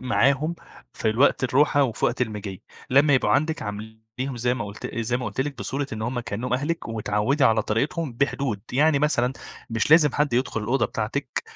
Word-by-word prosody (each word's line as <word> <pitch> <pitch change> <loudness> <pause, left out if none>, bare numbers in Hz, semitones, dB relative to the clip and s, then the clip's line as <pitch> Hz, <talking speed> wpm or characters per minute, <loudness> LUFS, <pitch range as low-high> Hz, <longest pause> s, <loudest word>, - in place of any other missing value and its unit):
معاهم 135 +5 +2 0.4
في - - -2
ال 110 - -4
وقت 135 0 +4
الروحة 145 +2 +3
وفي 120 -5 -1
وقت 125 +1 +1
المِجي. 105 -4 -5 0.3
لمّا 140 +2 +5
يبقوا 115 -5 +2
عندِك 155 +7 +1
عامليهم 110 +5 -6
زي 120 +1 +1
ما 115 - -4
قلت 100 0 -7
زي 115 +1 0
ما 125 - -5
قلت - - -3
لِك 140 0 -3
بصورة 140 +1 -3
إن 110 0 -4
هم 120 +2 -2
كأنهم 115 +2 -4
أهلِك 150 +2 -2
واتعودي 110 +5 0
على 110 -3 +4
طريقتهم 140 +7 -1
بحدود، 135 -3 -1
يعني 145 +3 +3
مثلًا 135 -4 +1 0.4
مش 115 +5 -1
لازم 150 -3 +6
حد 145 -2 0
يدخل 125 -2 0
الأوضة 120 +6 +1
بتاعتِك 125 +5 -3
125 Hz, 185 wpm, -24 LUFS, 110-140 Hz, 0.4 s, لازم